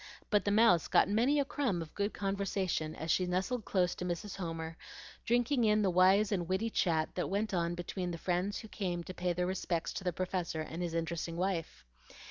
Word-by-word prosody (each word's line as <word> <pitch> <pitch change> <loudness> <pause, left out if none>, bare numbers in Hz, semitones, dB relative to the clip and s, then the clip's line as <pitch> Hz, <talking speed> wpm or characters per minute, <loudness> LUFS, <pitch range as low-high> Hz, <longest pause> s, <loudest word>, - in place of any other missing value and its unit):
But 210 -1 +3
the - - +2
Mouse 205 -5 +5
got - - +4
many 240 +9 +3
a 280 - +2
crumb 260 -10 -1
of 165 -2 -7
good 205 +1 -1
conversation 195 -5 -1
as 160 +1 -2
she 180 +2 +2
nestled 190 +6 -1
close 180 -2 +1
to - - -6
Mrs. 180 +3 -4
Homer, 165 -3 -4 0.5
drinking 245 +2 +2
in 215 -1 +4
the 190 - +2
wise 190 +4 +5
and 180 -4 -1
witty 205 +5 0
chat 160 -6 +1
that 180 - -2
went 205 +2 -1
on 170 -1 0
between 175 +1 -4
the 170 - -4
friends 180 +4 -1
who 220 - -8
came 180 -5 -3
to 185 - -7
pay 180 0 -1
their 180 +1 0
respects 180 -2 -2
to - - -5
the 180 - 0
Professor 180 -2 -2
and 160 +2 -5
his 170 -2 -2
interesting 165 0 -2
wife. 175 - -2
185 Hz, 210 wpm, -33 LUFS, 170-205 Hz, 0.5 s, Mouse